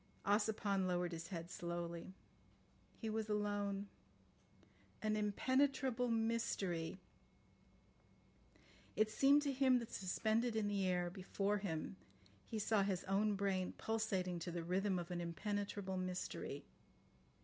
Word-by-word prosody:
Ossipon 205 -2 +2
lowered 180 -1 +1
his 165 0 -5
head 170 -2 -5
slowly. 170 0 -4 0.8
He 225 - -4
was 220 0 -1
alone. 205 -1 0 1.1
"An 215 0 +1
impenetrable 260 +4 +2
mystery.... 225 -7 0 1.0
" - - -28
It 215 0 +3
seemed 280 +5 +5
to 285 - +1
him 260 -1 +5
that 235 -2 -4
suspended 220 +5 +1
in 215 -2 +1
the 200 -2 +1
air 180 -1 +1
before 195 +2 0
him 185 0 -3 0.5
he 225 - -3
saw 215 0 +3
his 195 -2 0
own 205 +2 +2
brain 190 -2 0
pulsating 195 -6 -1
to 170 - -4
the 170 -1 -3
rhythm 185 +2 +1
of 175 0 -4
an 175 -1 -1
impenetrable 200 +2 -2
mystery. 185 0 -3
200 Hz, 125 wpm, -40 LUFS, 180-220 Hz, 1.1 s, seemed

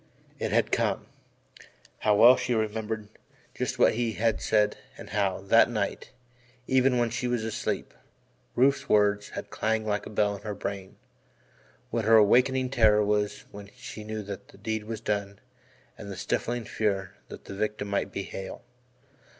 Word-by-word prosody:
It - - -2
had - - +2
come - - 0 0.9
how 105 -1 +3
well 120 +5 +8
she 125 - -1
remembered 110 0 -2 0.5
just - - -3
what - - +5
he 115 0 -1
had 115 0 0
said 105 -1 +2 0.2
and - - -10
how, 100 -3 0
that 105 +5 +5
night, 105 -4 -3 0.6
even 130 0 +3
when 120 -1 +1
she 125 +1 -2
was 120 -2 -1
asleep, 110 -1 -3 0.6
Rufe's 135 +3 +2
words 105 0 +3
had - - -6
clanged 110 0 0
like 105 -1 -1
a - - -8
bell 105 -1 +1
in 100 - -10
her 105 -1 -5
brain 100 -2 -5 1.0
what 115 -2 -1
her 115 +1 +6
awakening 125 +4 +4
terror 110 -4 +4
was 105 0 -1
when 100 0 -10
she 110 - -9
knew 110 0 -5
that 100 -1 -8
the - - -17
deed 110 +1 -3
was 110 -1 -5
done 100 -1 -2 0.6
and 100 - -8
the 95 - -6
stifling 120 +4 -2
fear 100 -4 -1
that - - -11
the - - -8
victim 105 +1 -2
might 100 0 -1
be 100 - -4
Hale. 95 0 -7
105 Hz, 165 wpm, -27 LUFS, 100-115 Hz, 1.0 s, well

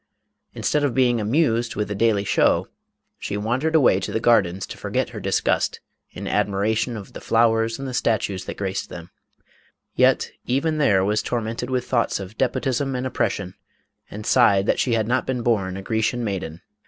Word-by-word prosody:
Instead 150 -1 0
of 140 -4 0
being 120 -3 +3
amused 120 0 +1
with 105 0 -1
the 105 - -3
daily 105 -1 +2
show, 100 - +2 0.5
she 100 - -4
wandered 125 +10 -1
away 125 -11 +5
to 95 - -4
the - - 0
gardens 95 -6 +2
to - - -9
forget - - -2
her - - -7
disgust - - 0 0.3
in - - -7
admiration 110 +4 0
of 100 - -10
the - - -9
flowers 115 0 +2
and 135 - -6
the 130 - -5
statues 100 -5 -1
that - - -6
graced 95 -1 -3
them, 85 0 -10 0.8
yet - - +3 0.2
even 155 +5 0
there, 100 -10 +3
was 105 +1 +1
tormented 115 +1 -3
with 125 -1 -1
thoughts 120 -5 0
of 95 +2 -8
despotism 135 +2 -1
and 125 +1 -2
oppression, 100 -7 -2 0.6
and 105 +1 -8
sighed 100 -1 +4
that - - +1
she 125 - +1
had 110 -1 0
not 125 +2 0
been 125 -2 -2
born 95 -6 0
a 95 - -7
Grecian 110 +3 -1
maiden. 90 -6 -4
115 Hz, 180 wpm, -23 LUFS, 100-125 Hz, 0.8 s, away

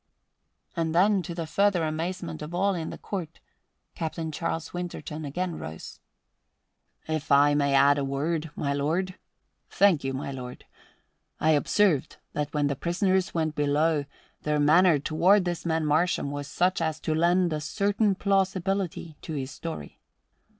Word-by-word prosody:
And 165 -1 -1
then, 195 +2 +4
to 170 -1 -6
the 165 -1 -3
further 195 +1 +2
amazement 160 +1 -3
of 155 +3 -6
all 195 +2 +2
in 165 -3 -3
the - - -7
court, 170 -5 -6 0.5
Captain 160 -1 -4
Charles 165 +1 -3
Winterton 170 -3 -5
again 175 +4 -3
rose. 80 +1 -8 1.1
"If 155 -2 -3
I 145 +1 +6
may 140 -1 +2
add 140 +1 +5
a - - -1
word, 150 +4 -2
my 140 -1 -1
lord? 165 +7 -1 0.6
Thank 195 -7 +3
you, 135 - -1
my 140 +1 -4
lord. 125 -2 -8 0.7
I 160 - +3
observed 155 +1 +2 0.2
that 150 0 -2
when 150 -1 0
the 140 0 0
prisoners 185 +5 0
went 160 -2 0
below 150 +1 +1 0.4
their 150 0 0
manner 160 +3 +5
toward 180 +7 +3
this 175 -1 -3
man 160 -1 +1
Marsham 150 -1 +1
was 145 0 -5
such 180 +4 +1
as 160 -2 -1
to 155 - -1
lend 175 +1 +2
a 150 - -2
certain 200 +5 +1
plausibility 190 -4 -1
to 160 - -6
his 135 -2 -4
story. 165 -1 -7
160 Hz, 155 wpm, -27 LUFS, 145-180 Hz, 1.1 s, I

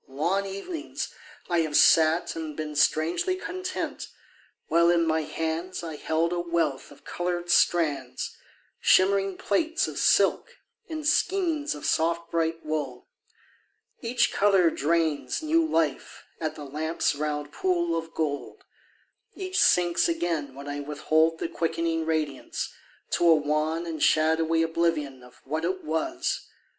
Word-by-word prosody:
Long 170 +9 -1
evenings 300 - -5 0.3
I 175 -1 +1
have 155 -2 +1
sat 160 +2 +4
and 160 -2 -6
been 155 -1 -4
Strangely 165 - +2
content, 370 0 -5 0.6
while 170 +1 +4
in 170 -1 +3
my 160 0 +1
hands 165 +4 -3
I 160 -2 -5
held 160 +3 0
a 175 - -1
wealth 170 -5 -1
of 145 - -17
coloured 175 0 -2
strands, 145 -8 +1 0.4
Shimmering 195 0 +3
plaits 320 - 0
of - - -5
silk 480 +1 +2 0.3
and 310 -2 -5
skeins 330 -2 +1
Of 145 - -8
soft 170 +1 0
bright 165 -1 -1
wool. 145 -5 -4 0.9
Each 240 0 +1
colour 195 -4 +4
drains 160 - 0
New 325 +2 +3
life 165 - -1 0.2
at 155 -1 -3
the 150 - -8
lamp's 155 +4 -1
round 150 0 -3
pool 170 -2 0
of 165 0 -5
gold; 145 -3 -3 0.7
Each 375 -1 -2
sinks 175 - +4
again 165 - -2
when 140 +1 -9
I 145 0 -4
withhold 155 +3 +1
The - - -3
quickening 165 -1 -1
radiance, 155 -4 -2 0.4
to 175 - +2
a 165 - +8
wan 155 +2 0
And 160 -3 -5
shadowy 160 +2 +3
oblivion 165 -5 -1
Of 125 0 -17
what 155 +4 -3
it 185 +2 -2
was. 325 - -2
165 Hz, 135 wpm, -26 LUFS, 155-180 Hz, 0.9 s, a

